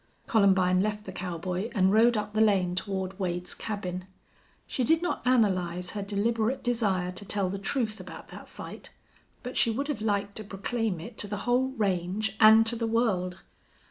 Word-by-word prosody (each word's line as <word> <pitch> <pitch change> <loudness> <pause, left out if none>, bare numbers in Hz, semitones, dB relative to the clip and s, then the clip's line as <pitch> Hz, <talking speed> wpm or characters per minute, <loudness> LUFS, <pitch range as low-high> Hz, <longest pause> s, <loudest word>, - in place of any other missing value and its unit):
Columbine 190 -4 +4
left 210 +1 -2
the 190 - -6
cowboy 180 +3 -4
and 190 -1 +3
rode 230 +1 +5
up 210 0 -3
the 215 - +2
lane 190 -5 +3
toward 190 0 -3
Wade's 180 -1 -2
cabin. 185 -4 -5 0.6
She 260 - -2
did 320 +6 +3
not 355 - -1
analyze 180 -7 +1
her 205 - -4
deliberate 220 +5 0
desire 200 -7 0
to 180 +2 -7
tell 195 -2 -1
the 195 - -4
truth 220 +1 -1
about - - -10
that - - -11
fight, - - -9 0.5
but 250 0 -5
she - - +4
would 275 +6 -2
have 240 -8 -2
liked 200 -2 -1
to 215 - -4
proclaim 205 -1 -2
it 220 +8 -9
to 205 - -1
the 205 0 -4
whole 250 +2 +2
range 195 +1 -1
and 220 +1 +8
to 230 +1 +2
the 230 0 -2
world. 190 -6 0
205 Hz, 180 wpm, -28 LUFS, 185-225 Hz, 0.6 s, and